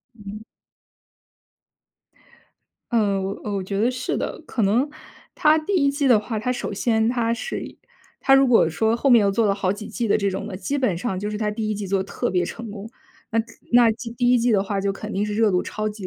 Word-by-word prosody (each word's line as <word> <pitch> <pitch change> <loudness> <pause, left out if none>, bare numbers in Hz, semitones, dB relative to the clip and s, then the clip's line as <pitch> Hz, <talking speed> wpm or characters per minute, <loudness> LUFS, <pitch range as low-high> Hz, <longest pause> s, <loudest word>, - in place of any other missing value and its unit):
嗯。 210 -1 -9 2.5
嗯， 200 -4 +1
我 190 - -2
呃， 210 - -5
我 195 - -2
觉 195 +1 -3
得 235 +3 +3
是 255 - -3
的。 - - -4
可 240 - -4
能 220 +7 +3 0.5
它 305 0 +4
第 310 +6 -4
1 280 -6 +3
季 280 0 -1
的 240 -5 +5
话， 220 +1 -4
它 250 +4 -1
首 240 -4 -4
先 220 +1 +1
它 235 -2 0
是 235 - -4
一 - - -10 0.4
它 270 - +5
如 270 0 +5
果 235 -9 +4
说 220 +8 +1
后 240 +4 0
面 240 -4 +6
又 200 - +3
做 215 +3 +1
了 200 - +2
好 190 -2 0
几 210 +1 -8
季 240 - -2
的 205 - +2
这 200 -1 0
种 195 +2 -4
的， 210 - -6
基 280 +8 -2
本 255 -10 0
上 195 -2 -3
就 205 +2 -3
是 210 - -4
它 215 -1 -1
第 215 0 -3
1 - - -1
季 205 -1 -5
做 190 0 0
得 - - -10
特 - - -3
别 180 -1 +1
成 225 +5 -7
功。 210 +1 -8 0.4
那 225 -1 +2
可 225 - -8 0.3
那 240 -1 +6
既 230 +1 -8
第 245 +1 +1
1 250 - +5
季 235 0 +2
的 200 -2 +3
话 200 0 -3
就 195 0 0
肯 210 +2 -7
定 200 0 -1
是 210 0 -3
热 220 0 +3
度 180 -1 +1
超 215 0 -3
级 210 -2 -7
215 Hz, 255 characters per minute, -23 LUFS, 200-240 Hz, 2.5 s, 面